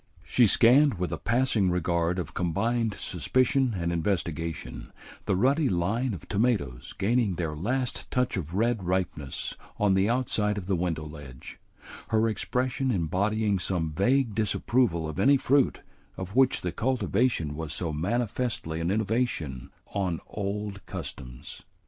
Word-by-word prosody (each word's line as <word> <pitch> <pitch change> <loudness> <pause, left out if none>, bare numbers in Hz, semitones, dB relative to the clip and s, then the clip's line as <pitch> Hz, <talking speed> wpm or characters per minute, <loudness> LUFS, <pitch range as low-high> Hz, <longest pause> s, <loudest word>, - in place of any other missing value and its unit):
She 120 -3 +4
scanned 130 +6 +5
with 90 -3 -3
a 85 - -3
passing 115 -4 +2
regard 85 0 0
of 85 -4 -4
combined 110 +6 0
suspicion 130 - +1
and 85 -1 -1
investigation 85 -2 -2 0.4
the - - +2
ruddy 135 - +3
line 105 +6 0
of 85 - -12
tomatoes 100 - -1
gaining 110 -2 +1
their 80 -3 -2
last 120 - -2
touch 125 -1 0
of 85 -2 -4
red 115 +1 +1
ripeness 90 -6 -2 0.2
on 105 -2 +3
the 95 +2 +3
outside 110 -4 +1
of 95 - -4
the 95 0 +1
window 85 -3 -2
ledge, 75 -5 -10 0.5
her 110 0 +2
expression 125 +4 -1
embodying 100 +2 +1
some 85 -3 -1
vague 120 - +2
disapproval 105 -4 +1
of 80 - -5
any 140 +1 +5
fruit 135 0 +2 0.4
of 95 +1 -6
which 130 -1 +4
the 90 - -2
cultivation 115 - 0
was 80 0 -5
so 85 -4 -3
manifestly 105 -1 -2
an 85 +1 -1
innovation 100 - -1 0.2
on 95 -3 0
good - - -10
old 100 0 -4
customs. 60 -3 -8
100 Hz, 145 wpm, -27 LUFS, 85-120 Hz, 0.5 s, scanned